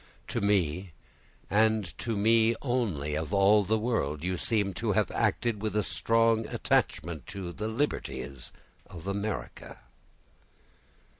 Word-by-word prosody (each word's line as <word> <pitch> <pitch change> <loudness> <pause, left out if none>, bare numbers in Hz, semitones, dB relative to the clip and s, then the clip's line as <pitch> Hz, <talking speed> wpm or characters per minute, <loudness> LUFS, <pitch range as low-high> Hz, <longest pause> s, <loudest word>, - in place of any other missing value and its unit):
To - - -2
me, 90 -3 +1 0.5
and 105 -5 +2
to 115 -3 -2
me 115 +2 +4
only 105 - -1
of 80 +6 -2
all 100 +2 +5
the 110 +3 +1
world, 95 - -1
you 90 +1 0
seem 100 +1 0
to - - -1
have - - +1
acted 115 -4 0
with 105 -2 -2
a 105 - +2
strong 115 +1 +2
attachment 80 -7 0
to 95 -3 -6
the 105 +4 -3
liberties 70 - -3 0.4
of 85 -2 -10
America." 100 +2 -4
100 Hz, 130 wpm, -29 LUFS, 85-110 Hz, 0.5 s, all